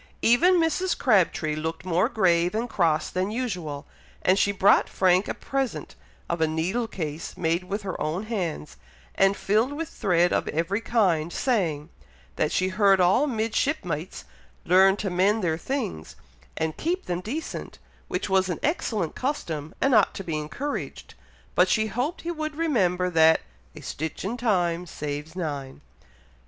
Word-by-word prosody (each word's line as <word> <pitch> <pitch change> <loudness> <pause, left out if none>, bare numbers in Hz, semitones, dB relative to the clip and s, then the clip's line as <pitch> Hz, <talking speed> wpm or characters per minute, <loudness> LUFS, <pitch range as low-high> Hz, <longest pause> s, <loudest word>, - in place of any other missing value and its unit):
Even 340 +11 +5
Mrs. 350 +2 +1
Crabtree 180 - +2
looked 160 +3 -4
more 185 +5 +2
grave 180 -5 +2
and 230 +2 -1
cross 160 -8 +1
than 185 +2 -1
usual; 180 - -4 0.4
and 185 +2 +3
she 200 - +3
brought 200 0 +4
Frank 185 +1 +3
a - - -3
present 270 -2 -3 0.3
of 170 -1 -2
a 160 - +4
needle 180 +10 -1
case 160 -6 -5
made 170 +2 0
with 200 +3 -4
her 190 -2 -5
own 155 +6 -1
hands, 185 - -4 0.4
and 195 +1 +3
filled 220 +7 +1
with 320 +2 -4
thread 175 -4 +2
of - - 0
every 170 +7 -1
kind, 180 -9 +1
saying, 170 - -1 0.5
that 150 - 0
she 185 0 +1
heard 195 0 +4
all 185 +11 +4
"midshipmites" 220 - -2 0.4
learned 190 +2 +5
to 195 -3 -3
mend 200 +4 +2
their 160 -2 +1
things, 175 - -4 0.4
and 160 -1 -2
keep 355 +4 -2
them 175 0 -2
decent, 275 - -5 0.3
which - - -2
was 190 -1 +2
an 180 - -2
excellent 220 - -1
custom, 160 - -3
and 270 - +2
ought - - +4
to 195 - -5
be 165 -4 -3
encouraged; 155 - -5 0.4
but - - +4
she 220 -1 +2
hoped 250 +9 -2
he 340 - -3
would 310 -2 -4
remember, 185 - +1
that 160 -1 +5 0.4
"a - - -10
stitch 160 +4 -5
in 220 +5 -2
time 180 -7 0
saves 150 +1 -5
nine." 145 - -4
185 Hz, 160 wpm, -25 LUFS, 165-230 Hz, 0.5 s, Even